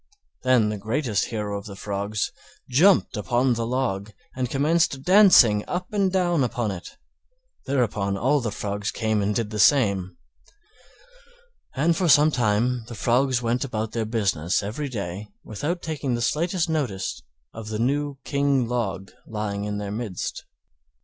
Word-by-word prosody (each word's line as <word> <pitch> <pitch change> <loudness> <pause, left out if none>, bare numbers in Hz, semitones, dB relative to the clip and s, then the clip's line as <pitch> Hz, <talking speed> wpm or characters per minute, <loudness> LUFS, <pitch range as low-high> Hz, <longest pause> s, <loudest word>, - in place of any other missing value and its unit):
Then 125 -4 +3
the 105 -1 -4
greatest 110 0 -1
hero 105 -3 -4
of 100 - -13
the 100 - -8
Frogs 100 +1 -3 0.4
jumped 165 +5 +4
upon 120 +4 +1
the 115 0 -2
Log 110 -5 -2 0.2
and 125 -1 -2
commenced 145 0 +1
dancing 180 - +6
up 180 +3 -4
and 195 -2 +2
down 175 -5 +2
upon 120 -3 -1
it, 90 -2 -9 0.7
thereupon 110 -7 0
all 135 +8 +2
the 115 - -2
Frogs 100 0 -3
came 110 -2 0
and 100 +1 0
did 115 -2 -2
the 105 - -4
same; 100 -7 +3 1.6
and 165 +5 +2
for 180 -2 +1
sometime 125 -5 +3
the 120 - -8
Frogs 125 +3 +1
went 120 +2 0
about 110 -4 -3
their 115 -1 -2
business 100 -6 0
every 125 +9 -4
day 100 -3 -5 0.2
without 150 - -4
taking 145 -6 -2
the 120 - -3
slightest 170 +5 0
notice 130 - -2 0.3
of 115 -1 -8
the 110 0 -3
new 140 +4 -1
King 140 -3 +1
Log 100 -5 -3 0.2
lying 105 -2 -3
in 105 0 -3
their 100 -1 -4
midst. 105 -4 -5
120 Hz, 150 wpm, -24 LUFS, 105-140 Hz, 1.6 s, dancing